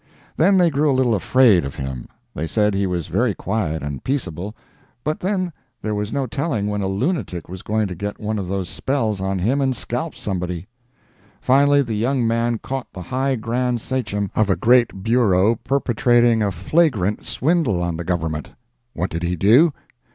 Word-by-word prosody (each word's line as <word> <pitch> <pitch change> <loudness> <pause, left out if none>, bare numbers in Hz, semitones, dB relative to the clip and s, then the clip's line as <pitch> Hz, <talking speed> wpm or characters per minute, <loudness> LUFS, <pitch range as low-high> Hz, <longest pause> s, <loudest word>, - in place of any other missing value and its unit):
Then 190 +5 +4
they 175 -3 +4
grew 145 +1 +2
a 135 - +2
little 125 -3 +3
afraid 110 -2 +4
of 70 -1 -6
him. 65 -2 -5 0.3
They 80 - -3
said 105 +5 +1
he 100 0 0
was 90 -3 -2
very 105 +3 0
quiet 95 -8 -2
and 70 -2 -5
peaceable, 105 - -3 0.5
but 155 +1 -2
then 185 -2 -1 0.3
there 110 - -1
was 105 +1 -3
no 140 -1 -1
telling 130 -4 -2
when 105 0 -1
a 95 - -1
lunatic 100 - -2
was 90 +1 -8
going 110 0 0
to 95 - -4
get 100 +4 -5
one 110 0 -2
of 95 - -4
those 95 -1 -2
spells 110 -7 -1
on 95 0 -1
him 120 +10 +1
and 130 -1 +1
scalp 125 +7 -3
somebody. 90 -3 -4 0.7
Finally 140 +2 +4
the 115 -4 -4
young 120 +4 0
man 115 +1 +1
caught 135 +3 -5
the 90 - -8
high 130 +7 0
grand 120 +1 -1
sachem 105 -6 -2
of 110 -2 +1
a 95 - +3
great 120 -5 +3
bureau 110 -3 +3
perpetrating 120 -2 +2
a 100 -2 +1
flagrant 105 - +1
swindle 145 - +1
on 85 -1 -2
the 85 - -4
Government! 80 -3 -2 0.5
What 90 +3 -2
did 85 - -3
he 90 +1 -1
do? 120 - +5
110 Hz, 185 wpm, -21 LUFS, 95-130 Hz, 0.7 s, do